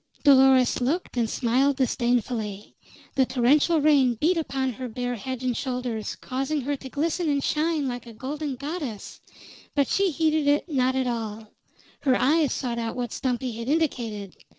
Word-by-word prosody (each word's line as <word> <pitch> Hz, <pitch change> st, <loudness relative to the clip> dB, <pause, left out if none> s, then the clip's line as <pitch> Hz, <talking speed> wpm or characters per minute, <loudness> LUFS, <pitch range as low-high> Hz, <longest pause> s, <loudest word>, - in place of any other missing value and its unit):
Dolores 265 Hz, -3 st, +5 dB
looked, 295 Hz, +7 st, -1 dB
and 235 Hz, -2 st, +1 dB
smiled 265 Hz, +5 st, +2 dB
disdainfully. 235 Hz, -5 st, -1 dB, 0.4 s
The 265 Hz, -2 st, +2 dB
torrential 285 Hz, +6 st, +3 dB
rain 280 Hz, -5 st, +4 dB
beat 320 Hz, +10 st, +2 dB
upon 270 Hz, -5 st, -1 dB
her 255 Hz, +3 st, -6 dB
bare 245 Hz, +2 st, -3 dB
head 255 Hz, +3 st, -5 dB
and 250 Hz, -2 st, 0 dB
shoulders, 250 Hz, -5 st, -3 dB
causing 270 Hz, +3 st, -2 dB
her 285 Hz, +3 st, -1 dB
to 270 Hz, -1 st, -9 dB
glisten 325 Hz, +4 st, -1 dB
and 280 Hz, -1 st, +1 dB
shine 310 Hz, -2 st, 0 dB
like 245 Hz, -1 st, -5 dB
a 230 Hz, -, -10 dB
golden 280 Hz, +4 st, -4 dB
goddess; 280 Hz, -, -6 dB, 0.5 s
but 280 Hz, -2 st, +3 dB
she 395 Hz, -1 st, +2 dB
heeded 315 Hz, -2 st, +1 dB
it 290 Hz, +4 st, +2 dB
not 260 Hz, -4 st, +1 dB
at 260 Hz, -1 st, +1 dB
all; 225 Hz, -3 st, -4 dB, 0.5 s
her 260 Hz, -3 st, +2 dB
eyes 300 Hz, +1 st, +3 dB
sought 235 Hz, -2 st, -2 dB
out 230 Hz, -1 st, -3 dB
what 245 Hz, -1 st, -3 dB
Stumpy 255 Hz, -1 st, -2 dB
had 230 Hz, +1 st, -6 dB
indicated. 235 Hz, -, -1 dB
260 Hz, 165 wpm, -25 LUFS, 240-290 Hz, 0.5 s, Dolores